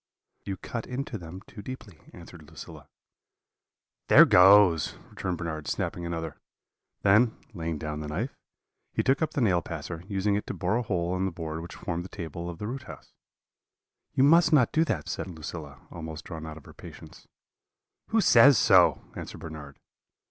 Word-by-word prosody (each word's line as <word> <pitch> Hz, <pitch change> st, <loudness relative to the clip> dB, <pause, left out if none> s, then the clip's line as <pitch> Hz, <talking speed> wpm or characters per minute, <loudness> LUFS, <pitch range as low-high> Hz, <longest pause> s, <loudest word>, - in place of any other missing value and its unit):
"'You 95 Hz, -1 st, -4 dB
cut 115 Hz, +4 st, -6 dB
into 125 Hz, -3 st, -4 dB
them 90 Hz, +2 st, -9 dB
too 105 Hz, -, -12 dB
deeply,' 100 Hz, -7 st, -10 dB
answered 85 Hz, -3 st, -13 dB
Lucilla. 80 Hz, -2 st, -11 dB, 1.2 s
"'There -, -, +9 dB
goes!' 90 Hz, -4 st, +6 dB, 0.2 s
returned 90 Hz, -2 st, -3 dB
Bernard, 80 Hz, -4 st, -5 dB
snapping 85 Hz, -1 st, -3 dB
another; 80 Hz, -2 st, -5 dB, 0.7 s
then, 110 Hz, +4 st, +4 dB, 0.2 s
laying 85 Hz, -4 st, -3 dB
down 75 Hz, 0 st, -5 dB
the 75 Hz, -, -5 dB
knife, 75 Hz, -, -4 dB, 0.6 s
he -, -, 0 dB
took 135 Hz, +4 st, +2 dB
up 160 Hz, -, -1 dB
the 140 Hz, -, 0 dB
nail 90 Hz, -7 st, +3 dB
passer, 85 Hz, 0 st, -7 dB
using 100 Hz, 0 st, 0 dB
it 105 Hz, -, -2 dB
to -, -, -4 dB
bore 110 Hz, -, 0 dB
a -, -, 0 dB
hole 90 Hz, -5 st, -1 dB
in 95 Hz, +1 st, -1 dB
the 95 Hz, -, -1 dB
board 80 Hz, -1 st, -5 dB
which 85 Hz, -, -9 dB
formed 85 Hz, 0 st, -4 dB
the 95 Hz, -, -10 dB
table 85 Hz, -1 st, -6 dB
of 85 Hz, -, -7 dB
the 105 Hz, -, -6 dB
root 130 Hz, +4 st, -5 dB
house. -, -, -12 dB, 1.0 s
"'You 130 Hz, -, +4 dB
must 155 Hz, +2 st, +5 dB
not 135 Hz, -7 st, +4 dB
do 160 Hz, -, +3 dB
that,' 95 Hz, -, -2 dB
said -, -, -4 dB
Lucilla, 80 Hz, -4 st, -8 dB
almost 80 Hz, -1 st, -8 dB
drawn 80 Hz, -2 st, -7 dB
out 80 Hz, 0 st, -8 dB
of 75 Hz, -, -14 dB
her -, -, -13 dB
patience. -, -, -13 dB, 0.8 s
"'Who 225 Hz, 0 st, +2 dB
says 130 Hz, -, +7 dB
so?' -, -, +5 dB
answered -, -, -7 dB
Bernard. 75 Hz, -3 st, -9 dB
90 Hz, 175 wpm, -27 LUFS, 80-110 Hz, 1.2 s, There